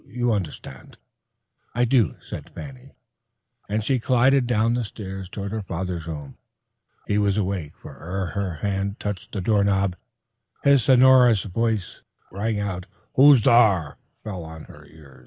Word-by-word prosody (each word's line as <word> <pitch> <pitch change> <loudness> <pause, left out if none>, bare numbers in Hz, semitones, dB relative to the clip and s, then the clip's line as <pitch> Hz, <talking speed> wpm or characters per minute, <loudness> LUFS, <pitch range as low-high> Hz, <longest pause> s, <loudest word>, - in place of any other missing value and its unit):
You 120 +1 -1
understand." 95 -8 -5 0.8
"I 120 +1 +2
do," 115 - +2
said - - -9
Fanny, 135 -1 -10 0.7
and 105 +1 -1
she 130 +3 +1
glided 130 +2 +3
down 115 -1 +2
the 120 0 -1
stairs 95 -3 -7
toward 100 +1 -6
her 110 0 -3
father's 90 -3 -5
room. 75 -4 -8 0.7
He 105 - 0
was 100 -1 +1
awake, 95 -7 -3
for - - -13
ere 95 +3 -3
her 100 -3 -2
hand 100 +1 -2
touched 105 -3 -5
the 100 - -4
doorknob, 100 -2 +1 0.7
his 140 -2 +5
sonorous 125 -2 +5
"Who's 110 +3 0
thar?" 105 -11 +4 0.3
fell 95 -5 -6
on 80 -1 -10
her - - -15
ear. 70 -5 -17
100 Hz, 135 wpm, -23 LUFS, 95-120 Hz, 0.8 s, his